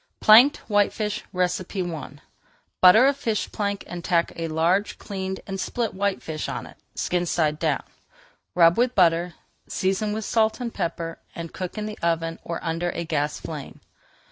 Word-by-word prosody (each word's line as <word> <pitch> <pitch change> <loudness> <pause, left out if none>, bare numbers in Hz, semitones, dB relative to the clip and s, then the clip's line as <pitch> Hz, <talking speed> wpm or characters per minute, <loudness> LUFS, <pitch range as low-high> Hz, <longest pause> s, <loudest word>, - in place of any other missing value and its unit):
PLANKED 240 +7 +7
WHITEFISH 210 0 0
I 180 -3 -2 0.7
Butter 200 +7 +8
a 280 - +4
fish 230 -6 -2
plank 200 -1 -2
and 175 -1 -7
tack 170 -1 +1
a 165 0 -3
large 170 +6 +1
cleaned 190 -2 -5
and 195 -1 -5
split 235 -2 -2
whitefish 190 -6 -2
on - - -4
it, - - -14 0.2
skin 175 0 -1
side 155 -3 +1
down. - - 0 0.7
Rub 170 +2 +5
with 250 +1 +2
butter, 170 -2 +3 0.3
season 195 +3 0
with 215 0 -3
salt 220 0 +1
and 240 -2 -4
pepper, 165 0 -3 0.2
and 170 -1 -7
cook 185 +2 -5
in 210 - -3
the 215 0 -6
oven 165 -1 -1
or 170 - -4
under 165 +1 -1
a 170 - -3
gas 150 -2 -1
flame. 150 -4 -8
180 Hz, 160 wpm, -24 LUFS, 165-210 Hz, 0.7 s, Butter